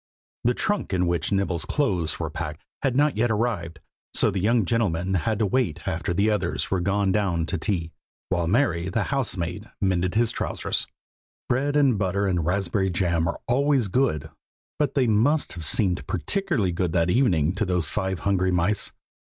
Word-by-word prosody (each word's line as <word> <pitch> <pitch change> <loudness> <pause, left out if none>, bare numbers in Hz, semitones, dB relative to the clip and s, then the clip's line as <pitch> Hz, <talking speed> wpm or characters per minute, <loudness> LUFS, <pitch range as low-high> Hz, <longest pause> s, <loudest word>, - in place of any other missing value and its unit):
The 120 +1 +2
trunk 205 - -1
in 90 -1 +2
which 85 -2 -1
Nibble's 95 -5 0
clothes 95 - -1
were - - -3
packed 75 +3 -6 0.2
had 135 -3 0
not 145 -1 +2
yet 120 +2 +2
arrived, 105 -7 -1 0.4
so - - +4
the 95 - -2
young 115 +1 +2
gentleman 95 -5 0
had 95 +5 0
to 110 - +1
wait 105 - -1
after 80 +1 -2
the 100 +5 +2
others 95 -4 -1
were 95 - +2
gone 100 +2 +1
down 95 -5 +1
to 90 +1 -3
tea, 85 -3 -2 0.4
while 85 -3 0
Mary, 95 -5 +1
the - - 0
housemaid, 105 -6 -2
mended 95 -2 0
his 115 0 +2
trousers. - - -2 0.6
Bread 140 +4 0
and 135 -8 +3
butter 100 +1 0
and 90 -4 0
raspberry 95 +2 0
jam 85 -2 0
are 85 - -3
always 135 -3 +2
good, 85 - 0 0.5
but 150 0 0
they 135 -3 +3
must 120 +8 +2
have 85 -1 -6
seemed 90 +2 +1
particularly 110 - 0
good 85 -1 -1
that 85 0 +2
evening 90 - +2
to 105 - -1
those 90 -5 +1
five 95 -4 -2
hungry 95 -2 +1
mice. 90 +3 +1
95 Hz, 180 wpm, -25 LUFS, 85-115 Hz, 0.6 s, so